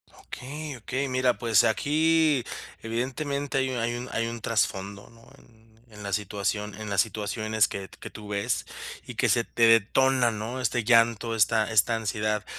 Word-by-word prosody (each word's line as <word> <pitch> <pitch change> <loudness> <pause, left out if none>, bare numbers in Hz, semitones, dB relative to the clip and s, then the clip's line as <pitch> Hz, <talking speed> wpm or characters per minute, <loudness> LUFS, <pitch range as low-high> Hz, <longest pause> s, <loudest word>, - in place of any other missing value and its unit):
Okey, 145 +3 -7
okey. 130 +4 -3
Mira, 130 -1 +2
pues, 115 -2 +4
aquí, 155 +2 +2 0.4
evidentemente, 135 +5 -2
hay 130 0 +1
un 125 - -3
hay 120 +1 -1
un 120 +1 -6
hay 115 0 -1
un 115 0 -6
trasfondo, 100 -3 -2
¿no?, 115 0 -19
en 110 -1 -23 0.2
en 105 -1 -11
la 100 - -4
situación 105 +1 -2
en 105 - -5
las 100 - 0
situaciones 110 0 0
que 100 -1 -6
que - - -7
tú 105 - -11
ves 100 -1 -1 0.4
y - - -8
que - - +2
se - - +3
te 115 -1 +3
detona, 120 +3 +4
¿no?, 110 +4 -5
este 120 -1 0
llanto, 115 0 +3
esta 110 0 +2
esta 110 +2 +3
ansiedad. 105 -1 -1
115 Hz, 170 wpm, -26 LUFS, 105-125 Hz, 0.4 s, pues